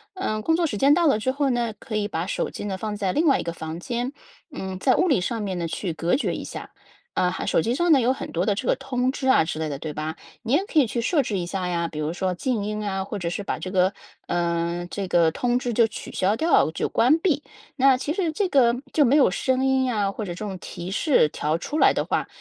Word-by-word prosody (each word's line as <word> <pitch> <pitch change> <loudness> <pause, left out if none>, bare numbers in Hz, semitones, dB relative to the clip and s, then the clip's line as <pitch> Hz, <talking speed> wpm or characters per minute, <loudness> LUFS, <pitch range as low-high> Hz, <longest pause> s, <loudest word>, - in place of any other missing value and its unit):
呃， 215 - -2
工 325 - +3
作 340 -1 +2
时 215 - -3
间 275 +6 +5
到 340 +1 +3
了 275 - +4
之 260 +4 0
后 280 +1 0
呢， 240 -3 0
可 225 - -6
以 210 -1 0
把 165 -1 -3
手 - - -2
机 - - -6
呢， 195 -2 -3
放 210 +1 -4
在 195 -3 0
另 320 - +2
外 280 -4 +4
一 - - -3
个 170 - -4
房 160 0 -6
间。 240 +6 -3 0.4
嗯， 190 -8 -5
在 255 +8 +3
物 360 - +2
理 275 - +3
上 225 +4 -2
面 195 -3 -3
呢， 170 -1 -2
去 175 +1 -3
隔 165 +2 +1
绝 - - -1
一 - - -5
下。 - - -8 0.4
呃， 180 - +1
还 - - -4
手 - - +3
机 235 - 0
上 345 +6 +2
呢 290 - +7
有 250 +1 +2
很 - - -7
多 175 +2 0
的 205 - +2
这 215 +6 -4
个 - - +3
通 250 0 -1
知 265 -1 -4
啊 260 - +5
之 160 -1 -4
类 160 -1 -2
的 140 -2 -5
对 155 - -5
吧？ 155 +2 -4 0.3
你 235 +2 -1
也 345 - +3
可 325 - -3
以 290 - +6
去 235 +1 -2
设 290 +5 +2
置 210 - -3
一 175 - -3
下 185 0 -3
呀， 170 -1 -1
比 160 - -9
如 155 +1 -2
说 185 +1 -1
静 230 +2 -1
音 210 0 -3
啊， 190 -1 -1
或 205 +2 -5
者 175 -3 -4
是 175 +4 -2
把 200 - -3
这 185 - -6
个， 185 0 +3 0.4
呃， 170 0 -1
这 200 -2 -3
个 170 -2 +3
通 245 +8 0
知 245 -1 -2
就 230 0 +4
取 220 - -8
消 195 +3 +1
掉， 320 - +3
就 160 - -2
关 265 +7 +4
闭。 320 -4 +1 0.3
那 270 -1 +5
其 280 +3 -2
实 350 -3 0
这 380 +5 0
个 245 -6 +4 0.2
就 300 - +4
没 270 +1 +4
有 280 -10 +5
声 260 +6 0
音 265 0 +3
呀， 210 -6 0
或 215 +1 -5
者 180 - -5
这 210 - -6
种 190 -3 -5
提 175 0 -7
示 255 - +3
条 150 +2 -1
出 300 - -3
来 - - +6
的 - - -1
话， - - -1
215 Hz, 300 characters per minute, -24 LUFS, 180-265 Hz, 0.4 s, 呢